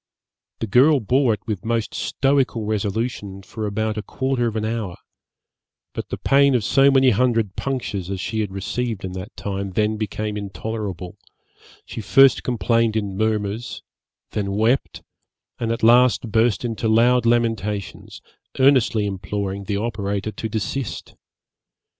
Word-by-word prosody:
The -, -, 0 dB
girl 135 Hz, +8 st, +5 dB
bore 125 Hz, +3 st, +2 dB
it -, -, -22 dB
with 105 Hz, -5 st, -4 dB
most 115 Hz, -2 st, -1 dB
stoical 135 Hz, -5 st, 0 dB
resolution 105 Hz, -1 st, -3 dB
for 110 Hz, +2 st, -5 dB
about 110 Hz, +1 st, -2 dB
a -, -, -3 dB
quarter 130 Hz, +2 st, -1 dB
of 115 Hz, -, -4 dB
an 110 Hz, -1 st, -1 dB
hour; 110 Hz, -5 st, -3 dB, 1.0 s
but -, -, -5 dB
the -, -, -4 dB
pain 140 Hz, -1 st, +4 dB
of 120 Hz, -, +1 dB
so 135 Hz, +5 st, +4 dB
many 135 Hz, -1 st, +5 dB
hundred 115 Hz, -3 st, +1 dB
punctures 100 Hz, -9 st, -3 dB
as 95 Hz, -1 st, -3 dB
she 110 Hz, +4 st, -3 dB
had 105 Hz, -3 st, -2 dB
received 110 Hz, +2 st, -3 dB
in 95 Hz, -, -5 dB
that 95 Hz, +4 st, -8 dB
time 100 Hz, -1 st, -4 dB
then 110 Hz, +2 st, +1 dB
became 105 Hz, 0 st, -3 dB
intolerable: 100 Hz, -3 st, -5 dB, 0.7 s
she -, -, -6 dB
first 130 Hz, +7 st, +5 dB
complained 115 Hz, -2 st, +1 dB
in 100 Hz, -3 st, -2 dB
murmurs, 110 Hz, +2 st, -2 dB, 0.5 s
then 100 Hz, -2 st, -2 dB
wept, 110 Hz, -, 0 dB, 0.6 s
and 115 Hz, -1 st, -1 dB
at 115 Hz, -, -3 dB
last 120 Hz, -1 st, +4 dB
burst 115 Hz, +1 st, +2 dB
into 115 Hz, -1 st, -2 dB
loud 115 Hz, +2 st, +4 dB
lamentations, 110 Hz, -4 st, -1 dB, 0.3 s
earnestly 130 Hz, -5 st, +4 dB
imploring 100 Hz, 0 st, -4 dB
the 100 Hz, -1 st, -1 dB
operator 100 Hz, -1 st, -2 dB
to 110 Hz, -, -5 dB
desist. 110 Hz, +4 st, -4 dB
110 Hz, 145 wpm, -22 LUFS, 100-120 Hz, 1.0 s, girl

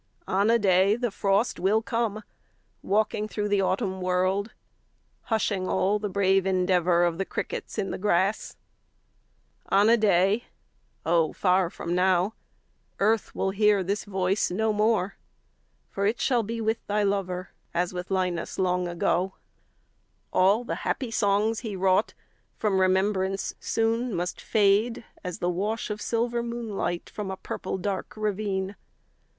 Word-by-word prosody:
On 200 Hz, +3 st, +2 dB
a 230 Hz, -, +5 dB
day 195 Hz, -1 st, +4 dB
the 240 Hz, -1 st, -2 dB
frost 200 Hz, +3 st, +1 dB
will 210 Hz, +4 st, +2 dB
come, 230 Hz, -2 st, -1 dB
5 215 Hz, -, -8 dB, 0.6 s
Walking 210 Hz, +1 st, 0 dB
through 210 Hz, -1 st, -3 dB
the 205 Hz, -1 st, +2 dB
autumn 190 Hz, 0 st, -1 dB
world, 185 Hz, +3 st, 0 dB, 0.7 s
Hushing 205 Hz, -4 st, 0 dB
all 200 Hz, +3 st, +1 dB
the 210 Hz, 0 st, -3 dB
brave 195 Hz, -1 st, +2 dB
endeavour 180 Hz, -2 st, +2 dB
Of 170 Hz, 0 st, 0 dB
the -, -, +2 dB
crickets -, -, -5 dB
in 195 Hz, -, -1 dB
the -, -, -4 dB
grass. 195 Hz, +1 st, 0 dB, 1.1 s
On 200 Hz, +3 st, +4 dB
a 235 Hz, -, +6 dB
day 200 Hz, +1 st, +3 dB, 0.6 s
(Oh, 165 Hz, -2 st, +2 dB
far 185 Hz, -2 st, +2 dB
from 170 Hz, 0 st, -4 dB
now!) 185 Hz, +2 st, +2 dB, 0.7 s
Earth 215 Hz, +2 st, +1 dB
will 190 Hz, -, 0 dB
hear 205 Hz, -1 st, +3 dB
this 200 Hz, +3 st, -2 dB
voice 190 Hz, 0 st, 0 dB
no 220 Hz, +4 st, 0 dB
more; 210 Hz, -2 st, +2 dB, 0.8 s
10 -, -, -41 dB
For 200 Hz, -, -1 dB
it 220 Hz, +3 st, 0 dB
shall 245 Hz, -3 st, +2 dB
be 230 Hz, +2 st, -4 dB
with 220 Hz, +1 st, -1 dB
thy 210 Hz, 0 st, +1 dB
lover 190 Hz, -2 st, -2 dB, 0.2 s
As 175 Hz, +1 st, -1 dB
with 180 Hz, 0 st, -5 dB
Linus 180 Hz, -3 st, -1 dB
long 180 Hz, -1 st, +1 dB
ago. 175 Hz, +2 st, 0 dB, 1.0 s
All 200 Hz, +6 st, +4 dB
the -, -, -4 dB
happy 255 Hz, -4 st, -2 dB
songs 215 Hz, +1 st, +1 dB
he 220 Hz, -5 st, -5 dB
wrought 190 Hz, +2 st, +2 dB, 0.4 s
From 195 Hz, -3 st, +1 dB
remembrance 190 Hz, +1 st, +1 dB
soon 230 Hz, 0 st, 0 dB
must 175 Hz, +1 st, -3 dB
fade, 215 Hz, +2 st, +2 dB, 0.2 s
As 180 Hz, -2 st, -4 dB
the 175 Hz, -, -1 dB
wash 210 Hz, +5 st, -2 dB
of 210 Hz, 0 st, -5 dB
silver 235 Hz, +1 st, 0 dB
moonlight 230 Hz, -7 st, -3 dB
15 -, -, -23 dB
From 205 Hz, -2 st, -4 dB
a 190 Hz, -, -4 dB
purple -, -, -4 dB
dark 195 Hz, +1 st, -4 dB
ravine. 200 Hz, -2 st, -2 dB
195 Hz, 150 wpm, -26 LUFS, 185-215 Hz, 1.1 s, a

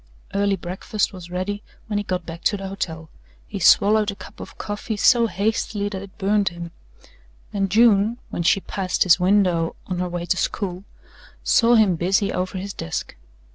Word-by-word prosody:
Early 200 Hz, 0 st, +2 dB
breakfast 190 Hz, +4 st, -2 dB
was 180 Hz, -2 st, -10 dB
ready 185 Hz, +3 st, -3 dB, 0.2 s
when 210 Hz, -2 st, -1 dB
he -, -, -2 dB
got 185 Hz, -3 st, -3 dB
back 165 Hz, 0 st, -8 dB
to 205 Hz, -, +2 dB
the 195 Hz, 0 st, -6 dB
hotel. 160 Hz, -5 st, -5 dB, 0.3 s
He -, -, -6 dB
swallowed 210 Hz, +1 st, +5 dB
a 200 Hz, -, -4 dB
cup -, -, -13 dB
of -, -, -10 dB
coffee 205 Hz, +1 st, -4 dB
so 235 Hz, +2 st, +5 dB
hastily 205 Hz, 0 st, -1 dB
that 190 Hz, -2 st, -5 dB
it 195 Hz, -1 st, -12 dB
burned 205 Hz, -1 st, +2 dB
him, 170 Hz, -1 st, -8 dB, 0.8 s
and 195 Hz, -1 st, 0 dB
June, 220 Hz, +1 st, +4 dB
when -, -, -3 dB
she 180 Hz, +3 st, +3 dB
passed 185 Hz, -1 st, -1 dB
his 185 Hz, -1 st, +5 dB
window 180 Hz, -3 st, +2 dB
on 180 Hz, -1 st, -3 dB
her 180 Hz, 0 st, -1 dB
way 175 Hz, 0 st, -4 dB
to 185 Hz, -, 0 dB
school, 185 Hz, -1 st, -2 dB, 0.6 s
saw 235 Hz, +1 st, +4 dB
him 205 Hz, -6 st, +4 dB
busy 195 Hz, +4 st, +1 dB
over 185 Hz, +1 st, -2 dB
his 195 Hz, +1 st, -5 dB
desk. 80 Hz, -, -5 dB
195 Hz, 180 wpm, -22 LUFS, 180-205 Hz, 0.8 s, swallowed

